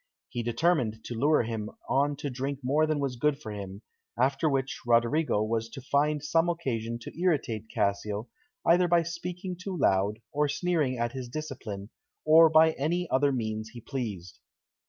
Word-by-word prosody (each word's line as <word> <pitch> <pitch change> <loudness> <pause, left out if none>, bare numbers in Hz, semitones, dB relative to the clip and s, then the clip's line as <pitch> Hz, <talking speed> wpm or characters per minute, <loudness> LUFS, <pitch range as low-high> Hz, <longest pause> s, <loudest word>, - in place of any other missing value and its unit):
He 120 - -3
determined 120 -2 +1
to 120 - -6
lure 145 +4 +3
him 110 -2 -4 0.2
on 145 +2 +2
to 140 0 -4
drink 135 +2 -3
more 150 +5 +2
than 155 -1 0
was 135 -3 -2
good 150 +3 +2
for 110 - -7
him, 100 0 -7 0.4
after 135 +4 +2
which 135 -1 -1
Roderigo 120 +1 +2
was 115 +1 -1
to 125 - -8
find 145 +3 +1
some 165 +3 +2
occasion 115 -9 -2
to - - -9
irritate 120 - 0
Cassio, 100 +3 -1 0.4
either 175 +2 +5
by 170 -1 +4
speaking 180 +2 -5
too 185 +1 -5
loud, 100 - +2
or 145 0 +1
sneering 150 -4 0
at 120 0 -1
his 130 -2 -6
discipline, 120 -8 -6 0.3
or 160 +1 +8
by 160 +1 +6
any 170 +5 0
other 140 +2 +3
means 110 -3 -3
he 120 - -8
pleased. 110 - -5
135 Hz, 170 wpm, -28 LUFS, 115-155 Hz, 0.4 s, or